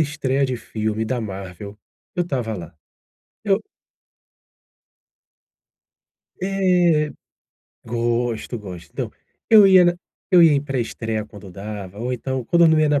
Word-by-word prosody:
estreia 140 -3 0
de 130 -1 -2
filme 110 -1 -3
da 120 +2 -2
Marvel, 100 0 -7 0.4
eu 175 - +2
estava 125 -9 -3
lá. 85 -1 -9 0.7
Eu 200 -1 +2 2.8
É. 180 -6 +2 0.7
Gosto, 120 0 -1
gosto. 90 -5 -10
Então, - - -4 0.4
eu 215 -3 +8
ia 185 -2 +7
na 175 0 +3 0.4
eu 180 -2 +7
ia 160 -2 +7
em 140 - +3
pré-estreia, 115 -5 -3
quando 105 -3 -12
dava, 100 0 -8
ou 125 +3 -2
então, 130 0 -3
quando 170 +6 +3
eu - - +5
não 160 -1 +4
ia 155 - +4
na 145 -1 +2
125 Hz, 135 wpm, -22 LUFS, 110-155 Hz, 2.8 s, eu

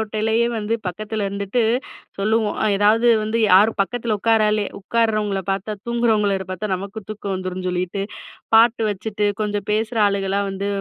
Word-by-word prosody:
ஓட்டையிலயே 220 +2 0
வந்து 215 +2 -1
பக்கத்துல 210 +3 -3
இருந்துட்டு 200 +4 -1 0.6
சொல்லுவோம். 215 +1 0 0.2
ஏதாது 220 +4 +4 0.2
வந்து 220 +2 -1
யாரும் 205 +4 +5
பக்கத்தில 230 +1 -2
உட்காராலே 215 -2 +2
உட்கார்றவங்களை 215 -3 0
பார்த்தா 195 +2 -3
தூங்குறவங்கள 235 -3 +2 0.2
பார்த்தா 190 +2 -3
நமக்கும் 200 +2 -8
தூக்கம் 200 -2 -4
வந்துரும்னு 185 0 -4
சொல்லிட்டு, 180 +2 -2 0.5
பாட்டு 230 0 +5
வச்சுட்டு 205 +1 -3 0.2
கொஞ்சம் 205 -1 -3
பேசுற 220 +2 -1
ஆளுகளலாம் 200 0 0
வந்து 195 +1 -4
210 Hz, 135 wpm, -21 LUFS, 195-225 Hz, 0.6 s, யாரும்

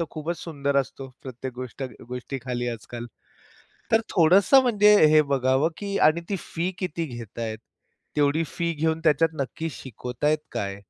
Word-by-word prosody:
तर 170 - +1
खूपच 165 +2 -4
सुंदर 140 -4 -2
असतो, 135 0 -2
प्रत्येक 130 0 -6
गोष्ट 130 +2 -7 0.3
गोष्टीखाली 125 -1 -4
आज-काल. 120 +1 -6 0.9
तर 225 - +5
थोडंसं 190 - +6
म्हणजे 210 -4 +5
हे 155 0 +6
बघावं, 135 +1 +2
की 200 -1 -3
आणि 165 +2 +2
ती 200 - 0
फी 170 +3 -3
किती 170 -3 -2
घेतायेत? 115 -3 -6 0.6
तेवढी 145 +2 +2
फी 170 0 -2
घेऊन 160 +1 0
त्याच्यात 155 +2 +3
नक्की 160 +5 -4
शिकवतायत 130 +5 -2
काय? 100 -1 -3
145 Hz, 145 wpm, -25 LUFS, 125-165 Hz, 0.9 s, थोडंसं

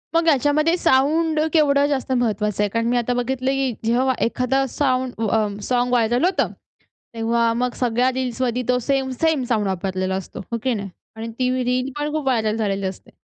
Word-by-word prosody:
मग 335 0 +3
ह्याच्यामध्ये 305 +2 +3
साउंड 315 +1 +2
केवढं 285 -3 +4
जास्त 270 -2 -2
महत्वाचं 210 -4 0
आहे? 205 - 0
कारण 230 +2 -1
मी 245 - +2
आता 240 +1 0
बघितलं, 255 +2 -1
की 270 -1 0
जेव्हा 250 +3 +2
एखादा 250 +3 +1
साउंड 255 -2 0 0.2
अ, 215 +1 +2 0.2
सॉंग 245 0 +1
व्हायरल 240 +4 +2 0.7
होतं.तेव्हा 230 0 -1
मग 250 - 0
सगळ्या 245 +1 +2
रील्स 260 -1 -3
मध्ये 250 0 0
तो 250 - +3
सेम, 270 -1 +1
सेम 320 -5 +2
साउंड 215 -4 +1
वापरलेला 190 0 -2
असतो. 190 - -7
हो 230 - 0
की 255 -2 +1
नाही? 200 -2 -4 0.3
आणि 225 +1 -5
ती 255 -1 +1
रील 250 +2 0
पण 295 0 -2
खूप 310 -2 -2
व्हायरल 220 -4 +1
झालेली 200 -3 -1
असते. 190 - -8
250 Hz, 180 wpm, -21 LUFS, 225-270 Hz, 0.7 s, केवढं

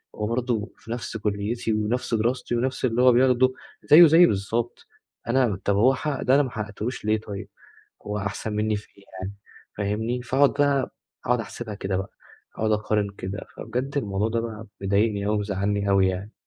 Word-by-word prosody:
هو 105 0 -2
برضه 115 -2 -1
في 110 +3 -11
نفْس 115 -1 -4
كليتي 110 +3 -2
ونفْس 110 +4 -1
دراستي 120 +2 0
ونفْس 130 +2 -1
اللي 120 0 +1
هو 130 - +8
بياخده، 130 +1 +4 0.3
زيّه 165 +3 +9
زيّي 165 +3 +7
بالضبط، 110 +4 -2 0.4
أنا 120 -6 +2
طَب 100 - +2
هو 125 +7 +5
حقق 140 +1 -3
ده، 130 - +4
أنا 145 - +5
ما 130 - -5
حققتهوش 110 +2 -5
ليه 110 0 +2
طيب؟ 100 -3 -7 0.6
هو 105 0 -2
أحسن 105 +1 -4
مني 105 0 +1
في 105 - -9
إيه 100 - -18 0.2
يعني؟ 95 +2 -5 0.4
فاهمني، 110 +4 -1
فأقعد 135 +3 +3
بقى، 140 -2 +1 0.4
أقعد 125 -1 +2
أحسبها 110 -1 -6
كده 95 -1 -2
بقى 95 +1 -4 0.5
أقعد 110 0 +1
أقارن 105 -1 0
كده. 95 +3 -5 0.2
فبجد 125 +5 -4
الموضوع 100 -3 -1
ده 115 0 0
بقى 110 -1 -6 0.2
مضايقني 100 +1 +1
أوي، 105 0 +1
مزعلني 100 0 -1
أوي 95 -1 +4
يعني. 95 +4 -4
110 Hz, 180 wpm, -25 LUFS, 100-125 Hz, 0.6 s, زيّه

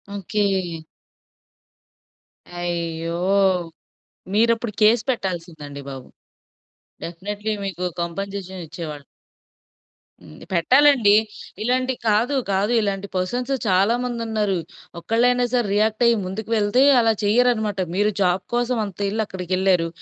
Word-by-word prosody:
Okay. 195 -3 -1 1.8
అయ్యో! 170 -1 -3 1.2
మీరప్పుడు 230 +1 +2
case 215 +2 +5
పెట్టాల్సిందండి 165 - -4
బాబు. 135 -2 -8 1.0
Definitely 205 +5 -4
మీకు 180 -2 -4 0.2
compensation 190 +1 -5
ఇచ్చేవాళ్ళు. 155 -2 -7 1.2
హ్మ్. 75 - -14 0.2
పెట్టాలండి. 250 +3 +5 0.5
ఇలాంటివి 255 +2 0
కాదు, 225 +7 +2 0.2
కాదు 195 +3 +1
ఇలాంటి 200 -1 -2
పర్సన్స్ 245 +8 -2 0.2
చాలామంది 230 +6 +1
ఉన్నారు. 210 -4 0 0.4
ఒక్కళ్ళైనా 245 +6 +2
సరే 240 -4 +2
రియాక్ట్ 215 +3 +1
అయ్యి 235 - +4
ముందుకు 205 +4 -6
వెళ్తే 210 +4 +2 0.2
అలా 225 -1 +3
చెయ్యరనమాట. 220 -2 +2 0.2
మీరు 205 +2 +2
జాబ్ 180 0 +2
కోసం 240 +1 0
అంత 195 -4 -9
ఏళ్ళు 220 +2 -1
అక్కడికి 185 -2 -5
ఎళ్లారు. 185 -3 +2
205 Hz, 100 wpm, -22 LUFS, 180-230 Hz, 1.8 s, case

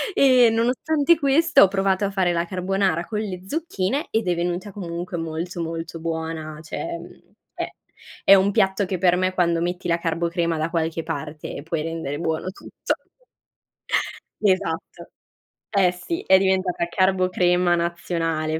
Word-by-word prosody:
ehm, 250 -4 +6
nonostante 285 +7 +2
questo 315 +3 +4
ho 195 - +7
provato 195 0 +1
a 200 - -2
fare 185 -3 +1
la 170 0 0
carbonara 185 -1 0
con 210 +2 -3
le 190 -4 -4
zucchine 285 - -2
ed 220 -3 0
è 175 - +2
venuta 175 +4 -2
comunque 175 -2 -5
molto, 165 +2 -4
molto 165 0 -5
buona. 160 -1 -4
Cioè, 335 - -5
mhmm, - - -15 0.2
è - - -3 0.6
è 195 - +9
un 195 +1 +3
piatto 190 +1 +2
che 185 0 -2
per 180 0 +3
me, 185 +1 0
quando 170 -2 +1
metti 175 +1 -2
la 170 - +2
carbocrema 170 0 -1
da 155 +1 -1
qualche 165 -1 -1
parte, 150 0 -6
puoi 160 -1 -2
rendere 165 -3 -4
buono 160 +2 -2
tutto 190 - -4 1.5
Esatto. 185 -4 -1 0.6
Eh, 195 -4 +3
sì, 180 - -5
è 190 - +7
diventata 190 -2 +1
carbocrema 180 -1 +2
nazionale 165 -2 -1
180 Hz, 150 wpm, -23 LUFS, 165-195 Hz, 1.5 s, è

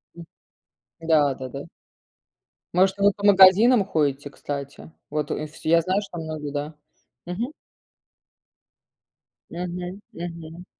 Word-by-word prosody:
М. 170 - -9 0.8
Да-да-да. 140 -4 0 1.1
Может, 190 +2 +3
вы 200 0 +5
и - - -3
по 205 - -6
магазинам 200 +3 +7
ходите, 145 -5 -1
кстати? 140 +2 -7 0.2
Вот, 150 0 -3
э, 155 - -2
вс 155 - -16
я 165 +1 +4
знаю, 185 +4 0
что 195 -4 -9
многие, 155 -2 -5
да. 145 +2 -4 0.5
Мгм. 220 - -4 2.0
Мгм. 180 +2 -5
Мгм. 170 -1 -8
170 Hz, 110 wpm, -24 LUFS, 150-190 Hz, 2.0 s, магазинам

